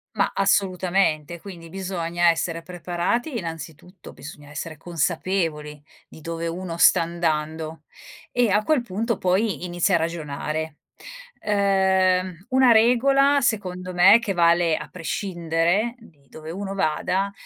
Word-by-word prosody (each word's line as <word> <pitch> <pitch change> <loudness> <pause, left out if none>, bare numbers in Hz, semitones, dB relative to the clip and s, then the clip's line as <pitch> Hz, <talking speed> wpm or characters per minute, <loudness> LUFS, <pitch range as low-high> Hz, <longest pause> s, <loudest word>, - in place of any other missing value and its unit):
Ma 200 - +1
assolutamente, 185 -4 +1
quindi 170 -3 -11
bisogna 175 -2 0
essere 165 0 -3
preparati 180 - -2
innanzitutto, 165 0 -8
bisogna 145 0 -12
essere 155 +2 -6
consapevoli 165 -2 -2 0.3
di - - -14
dove 165 +1 -4
uno 170 0 -5
sta 170 - +5
andando. 160 -1 -3 0.5
E 245 -2 +2
a 205 +2 +2
quel 305 +1 +2
punto 230 +1 -3
poi 185 -2 0
inizia 175 +2 +1
a - - +5
ragionare. 155 -1 -4 0.6
Uhm, 190 -3 +1
una 260 -1 +5
regola 270 +5 +4
secondo 185 -6 -2
me 185 +5 +7
che 210 -4 -3
vale 170 -1 +3
a - - -7
prescindere 175 +3 -1
di 150 - -21
dove 155 +2 -11
uno 195 +2 -5
vada 190 +2 -1
180 Hz, 125 wpm, -23 LUFS, 165-195 Hz, 0.6 s, me